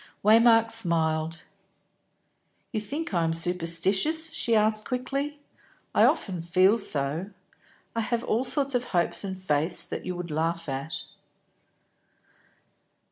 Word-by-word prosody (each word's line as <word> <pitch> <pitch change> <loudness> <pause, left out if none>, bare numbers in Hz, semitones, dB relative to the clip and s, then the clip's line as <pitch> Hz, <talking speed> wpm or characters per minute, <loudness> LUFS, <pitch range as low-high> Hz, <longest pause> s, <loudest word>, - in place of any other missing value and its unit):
Waymark 225 +1 +5
smiled. 160 -1 0 1.3
"You 215 - -2
think 290 +5 -5
I 170 -2 +2
am 165 0 0
superstitious?" 180 - +1
she 230 -2 +1
asked 215 0 +2
quickly. 275 +4 -3 0.6
"I - - +5
often 180 -4 0
feel 185 +6 +3
so. 155 +1 -1 0.7
I 230 - 0
have 235 +1 -2
all 230 +4 0
sorts 270 +2 +1
of 245 0 0
hopes 175 -1 0
and 190 -1 -5
faiths 160 -1 -1
that - - -6
you 180 0 -4
would 175 -2 -6
laugh 165 +2 -2
at." 135 +2 -4
190 Hz, 125 wpm, -26 LUFS, 165-230 Hz, 1.3 s, Waymark